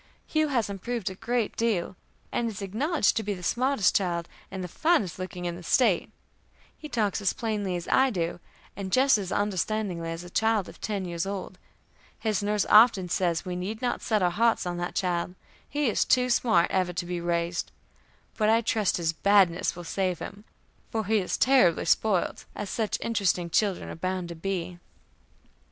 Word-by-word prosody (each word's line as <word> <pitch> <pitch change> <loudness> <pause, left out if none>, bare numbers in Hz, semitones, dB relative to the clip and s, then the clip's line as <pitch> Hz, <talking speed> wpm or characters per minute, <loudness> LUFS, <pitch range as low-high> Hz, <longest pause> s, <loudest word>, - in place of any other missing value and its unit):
Hugh 310 0 +1
has 250 -6 0
improved 200 +1 -3
a - - -6
great 235 +3 -2
deal, 210 -6 0 0.4
and 235 -1 0
is 205 -2 -6
acknowledged 235 - +1
to - - +1
be 205 -1 -3
the 180 - -10
smartest 250 +1 +2
child 175 -3 0 0.2
and 190 -1 -5
the - - -4
finest 210 - +1
looking 180 -1 -5
in 175 -1 -2
the 175 - -9
State; 195 +1 +2 0.7
he 305 - -10
talks 215 -5 0
as 195 - +1
plainly 210 -5 -2
as 175 -1 -5
I 265 0 +4
do, 175 -6 -2 0.4
and 190 -1 -5
just 260 -1 +4
as 195 -2 -5
understandingly 200 -3 -1
as 165 +1 -5
a 175 - -10
child 220 -2 +1
of - - -13
ten 200 -3 -2
years 170 +1 -3
old; 190 -2 -5 0.6
his 215 -3 -1
nurse 205 0 0
often 210 -4 +6
says 170 -2 0
we 180 -1 -3
need 195 +5 -4
not 245 -1 -1
set 215 -4 +1
our 175 - +3
hearts 225 +4 +2
on 175 -1 -3
that 175 0 -4
child, 180 -1 -1 0.3
he 290 -1 0
is 220 - +2
too 250 0 +2
smart 220 -8 +3
ever 185 -2 0
to 175 0 -3
be 175 0 -3
raised; 170 0 -1 0.7
but 215 -1 +2
I 225 +1 +4
trust 215 -3 +1
his 165 -2 0
badness 190 -1 +3
will 175 - -8
save 185 +1 -1
him, 200 +6 -9 0.4
for 220 -1 -2
he 220 +2 +2
is 185 - -2
terribly 255 -11 +4
spoilt, 190 +2 +1
as 210 - -5
such 220 -3 -1
interesting 185 -6 0
children 200 0 +1
are - - -6
bound 185 +1 -3
to 170 - -6
be. 175 0 -4
195 Hz, 190 wpm, -27 LUFS, 175-220 Hz, 0.7 s, often